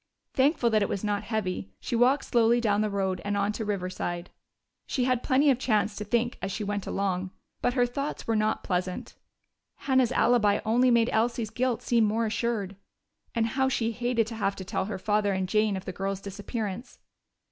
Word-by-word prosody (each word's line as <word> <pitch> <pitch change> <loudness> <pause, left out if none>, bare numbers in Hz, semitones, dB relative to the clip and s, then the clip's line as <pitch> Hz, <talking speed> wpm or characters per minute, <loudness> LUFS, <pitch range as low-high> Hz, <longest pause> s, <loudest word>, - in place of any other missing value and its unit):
Thankful 265 -3 +3
that 215 -1 +3
it 200 - +1
was 200 - -3
not 205 -1 0
heavy, 185 - -2
she - - -3
walked 255 +4 +3
slowly 235 0 +3
down 210 -3 +2
to 215 - +1
the - - -5
road 190 -2 -1
and 205 0 -1
on 200 +1 +1
to 220 - -4
Riverside. 185 -3 -3 0.6
She 255 - 0
had 250 -1 +1
plenty 280 +2 +4
of 255 - 0
chance 215 -4 +1
to 210 - -4
think 235 +3 0
as 195 - -3
she 215 - -3
went 205 -1 -3
along, 190 -1 -1 0.3
but 245 +1 +1
her 245 -2 +4
thoughts 275 +4 -4
were 225 - 0
not 215 0 0
pleasant. 180 0 -2 0.6
Hannah's 260 -3 +2
alibi 225 -4 +3
only 245 +4 +4
made 235 -1 +3
Elsie's 225 -1 0
guilt 250 0 -1
seem 235 -2 +3
more 220 +2 +1
assured. 215 -3 -2 0.6
And 230 -1 +2
how 265 +3 +1
she 230 -3 0
hated 240 0 0
to 225 +1 -7
have 200 -2 0
to 190 - -7
tell 185 - -2
her 205 0 -4
father 205 +1 +1
and 190 -1 -1
Jane 215 0 +2
of 190 - -8
the 185 - -5
girl's 195 +1 -3
disappearance! 205 +3 -5
220 Hz, 200 wpm, -27 LUFS, 200-240 Hz, 0.6 s, plenty